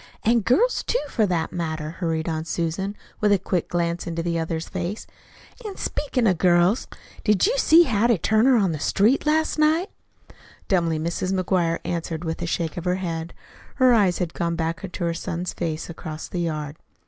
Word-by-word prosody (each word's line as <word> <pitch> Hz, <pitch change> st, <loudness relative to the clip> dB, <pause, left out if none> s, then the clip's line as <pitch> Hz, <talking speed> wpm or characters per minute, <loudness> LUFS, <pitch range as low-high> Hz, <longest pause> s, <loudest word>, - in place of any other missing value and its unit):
"An' 235 Hz, +2 st, +4 dB
girls, 255 Hz, -, +2 dB
too, -, -, 0 dB
for 220 Hz, -5 st, +1 dB
that 170 Hz, -3 st, -1 dB
matter," 160 Hz, -3 st, -3 dB
hurried 165 Hz, -2 st, -2 dB
on 160 Hz, -1 st, -2 dB
Susan, 170 Hz, +5 st, -2 dB, 0.2 s
with 210 Hz, -1 st, +3 dB
a 200 Hz, -, +5 dB
quick 180 Hz, -2 st, -2 dB
glance 170 Hz, 0 st, -1 dB
into 165 Hz, 0 st, -3 dB
the 170 Hz, -1 st, -1 dB
other's 160 Hz, 0 st, -3 dB
face. 185 Hz, +3 st, -4 dB, 0.6 s
"An' 415 Hz, -3 st, -6 dB
speakin' 265 Hz, -5 st, -1 dB
of 185 Hz, -6 st, +2 dB
girls, 175 Hz, +4 st, +3 dB, 0.4 s
did 210 Hz, -3 st, +3 dB
you 465 Hz, +5 st, +2 dB
see 335 Hz, -4 st, +7 dB
Hattie 235 Hz, -, +2 dB
Turner 220 Hz, +8 st, +3 dB
on 195 Hz, -5 st, +2 dB
the 155 Hz, -, -4 dB
street 220 Hz, -, +2 dB
last 315 Hz, 0 st, +1 dB
night?" 320 Hz, +6 st, +2 dB, 0.8 s
Dumbly 170 Hz, -4 st, +1 dB
Mrs. 170 Hz, +4 st, -1 dB
McGuire 175 Hz, -3 st, +1 dB
answered 165 Hz, -1 st, -3 dB
with 160 Hz, 0 st, -4 dB
a 170 Hz, -, -2 dB
shake 165 Hz, -1 st, -2 dB
of 175 Hz, -, -5 dB
her 180 Hz, 0 st, +2 dB
head. 170 Hz, -3 st, -4 dB, 0.4 s
Her 255 Hz, -2 st, +5 dB
eyes 200 Hz, -6 st, +3 dB
had 175 Hz, -3 st, -3 dB
gone 170 Hz, -1 st, -1 dB
back 165 Hz, +3 st, -3 dB
to 175 Hz, -, -5 dB
her 170 Hz, 0 st, 0 dB
son's 175 Hz, +1 st, -4 dB
face 160 Hz, -2 st, -3 dB
across 160 Hz, -2 st, -7 dB
the 175 Hz, -, -3 dB
yard. 155 Hz, -3 st, -3 dB
175 Hz, 185 wpm, -24 LUFS, 165-210 Hz, 0.8 s, see